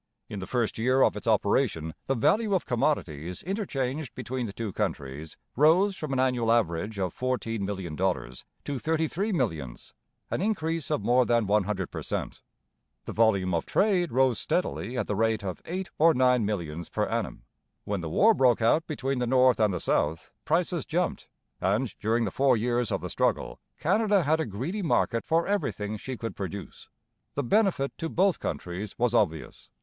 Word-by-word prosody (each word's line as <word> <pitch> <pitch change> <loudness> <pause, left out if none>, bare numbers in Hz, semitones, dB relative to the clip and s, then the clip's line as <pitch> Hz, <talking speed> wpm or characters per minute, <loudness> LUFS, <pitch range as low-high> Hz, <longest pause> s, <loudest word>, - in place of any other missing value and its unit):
In 105 - -5
the 95 - -6
first 120 -3 -1
year 130 +3 +3
of - - +3
its 105 - -7
operation 100 - +1
the 135 - +1
value 205 - +2
of 185 - 0
commodities 90 - -1
interchanged 155 - -3
between 125 -2 -3
the - - -5
two 105 -1 -5
countries 70 +3 -4 0.2
rose 175 +8 +4
from 155 -6 -5
an 135 - 0
annual 125 -3 +2
average 105 -2 0
of 95 -3 -1
fourteen 115 -4 -2
million 95 -5 -4
dollars 90 -8 -2 0.2
to 140 -2 -3
thirty 160 +3 0
three 200 +8 -2
millions, 80 - -3 0.4
an - - -1
increase 165 - -1
of - - -1
more 125 +3 +4
than 120 -2 +2
one 100 0 +2
hundred 95 -3 -3
per - - -5
cent. - - -4 0.6
The - - -5
volume 100 -5 +2
of 85 - -1
trade 190 -5 +2
rose 130 -2 +3
steadily 130 -8 -2
at - - 0
the 105 - -2
rate 110 0 +1
of 95 -2 -5
eight 185 0 -4
or 165 +1 +6
nine 125 -4 +3
millions 85 -5 -4
per - - 0
annum. - - -3 0.4
When 100 -3 -2
the 80 - -4
war 220 - +5
broke 130 - +3
out 150 +9 +2
between 135 -4 -2
the 125 - 0
North 130 -1 +4
and 105 -2 +3
the 90 - -2
South, 80 +1 -1
prices 170 +1 +1
jumped, 175 +3 -2 0.3
and, 105 +6 0
during 115 +2 +1
the - - -2
four 135 -3 +3
years 120 +1 0
of - - -1
the - - -5
struggle, - - 0 0.2
Canada 205 +2 +2
had 155 +2 +2
a 160 - -1
greedy 135 - -3
market 125 -8 +1
for 165 +1 +2
everything 110 - -1
she 130 +4 -6
could 115 0 -5
produce. 100 -1 -7 0.5
The 145 - 0
benefit 175 - +1
to 165 - -2
both 190 +1 +2
countries 95 +4 -5
was 120 -1 +1
obvious. 80 -9 -1
120 Hz, 185 wpm, -27 LUFS, 100-155 Hz, 0.6 s, or